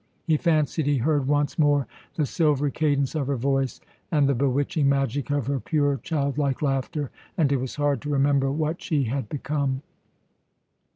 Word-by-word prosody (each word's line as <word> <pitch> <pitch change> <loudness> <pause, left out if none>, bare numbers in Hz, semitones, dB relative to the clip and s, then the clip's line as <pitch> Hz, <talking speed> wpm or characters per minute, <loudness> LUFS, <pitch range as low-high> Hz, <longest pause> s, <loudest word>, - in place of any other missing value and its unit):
He 160 - +3
fancied 155 -1 +1
he 145 -1 +3
heard 140 +1 +1
once 145 +2 +1
more 145 -3 +3 0.3
the 155 - +1
silvery 145 -2 +1
cadence 140 -3 +1
of 150 -4 -1
her 140 - 0
voice 135 0 0 0.3
and 145 -4 +3
the 140 - +3
bewitching 140 +3 +1
magic 140 0 0
of 145 -3 0
her 140 +1 -1
pure, 145 0 +1
childlike 140 -2 -1
laughter, 135 0 -1 0.3
and 150 -5 +3
it 140 - +3
was 130 0 -4
hard 145 -3 0
to 145 - -5
remember 140 -1 +2
what 155 +3 -2
she 155 -7 0
had 125 -1 -2
become. 140 -1 -2
140 Hz, 170 wpm, -25 LUFS, 135-150 Hz, 0.3 s, He